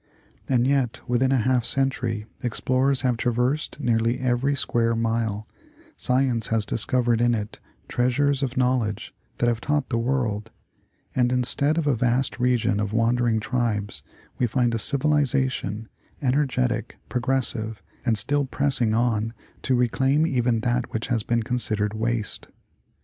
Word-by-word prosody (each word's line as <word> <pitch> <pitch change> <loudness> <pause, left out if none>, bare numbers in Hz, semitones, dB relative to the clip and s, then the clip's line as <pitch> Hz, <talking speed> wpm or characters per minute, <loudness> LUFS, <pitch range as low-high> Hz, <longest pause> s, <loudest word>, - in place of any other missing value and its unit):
And 125 -2 +3
yet 135 -3 +1
within 125 +2 +2
half 130 -1 +2
a - - -9
century 125 -5 -1 0.2
ex 120 -3 -2
plorers 130 +1 +1
have 125 -3 +1
traversed 125 +7 -1
nearly 115 -2 +1
eveiy 130 +2 0
square 115 -2 +1
mile, 115 -2 -1 0.5
science 125 -2 +1
has 110 -2 0
dis 110 - -2
covered 120 -2 +1
in 120 0 +3
it 105 -1 -5 0.3
treasures 135 +3 +1
of 130 -2 -2
knowledge 125 -4 0 0.2
that - - +1
have 120 -1 +1
taught 145 -1 0
the 115 -2 0
world: 115 -4 -1 0.7
and 125 -1 +2
instead 130 +5 +2
of 165 - 0
a 145 -3 +2
vast 125 +3 0
region 125 -4 +2
of 105 0 -2
wandering 115 0 +2
tribes, 105 - -2 0.4
we 125 - +2
find 120 0 +1
a 115 - 0
civili 145 +6 +2
zation, 130 -6 -1 0.3
energetic, 125 -4 0
progressive, 120 -5 -1 0.2
and 115 -4 +1
still 145 +6 0
pressing 130 -5 0
on 115 -1 0 0.3
to 130 - +1
reclaim 130 +5 +2
even 125 -6 +1
that 120 +1 -1
which 110 - -3
has 115 -2 +1
been 115 +2 0
considered 110 -3 0
waste. 115 -1 -2
120 Hz, 150 wpm, -24 LUFS, 115-130 Hz, 0.7 s, And